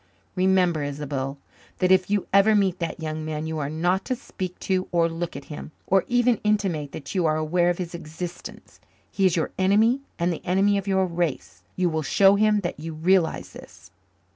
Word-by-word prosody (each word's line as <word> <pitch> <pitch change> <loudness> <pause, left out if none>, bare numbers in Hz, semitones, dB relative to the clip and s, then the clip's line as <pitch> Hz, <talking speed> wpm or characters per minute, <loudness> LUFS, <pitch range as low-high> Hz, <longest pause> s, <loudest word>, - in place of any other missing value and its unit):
Remember, 185 -3 +2
Isobel, 140 -1 -4 0.4
that 185 0 +2
if 185 0 +4
you 205 -1 +1
ever 200 +2 +5
meet 190 -3 +1
that 170 -1 -4
young 155 -1 -4
man 155 0 -4
you 160 -1 -3
are 140 -1 -2
not 175 +5 0
to 255 - -1
speak 185 -7 -7
to 185 -1 0
or 170 -2 +3
look 165 +1 -5
at - - -8
him, 150 0 -9
or 190 0 +2
even 245 -1 +2
intimate 190 -9 0
that 140 - -8
you 180 -4 +1
are 155 - +2
aware 170 +3 +1
of 175 - 0
his 180 -2 -5
existence. 170 +1 -8 0.3
He 195 -1 +3
is 180 - +1
your 165 - -1
enemy 215 +7 +3 0.2
and 170 +1 0
the 160 - -8
enemy 200 +2 +2
of 195 - -8
your 190 -1 +2
race. 170 -4 -3
You 185 -1 +1
will 160 -2 -1
show 195 +7 +4
him 210 0 +3
that 175 -4 -4
you 160 +1 -6
realize 170 +1 +1
this." - - -14
175 Hz, 200 wpm, -24 LUFS, 160-195 Hz, 0.4 s, ever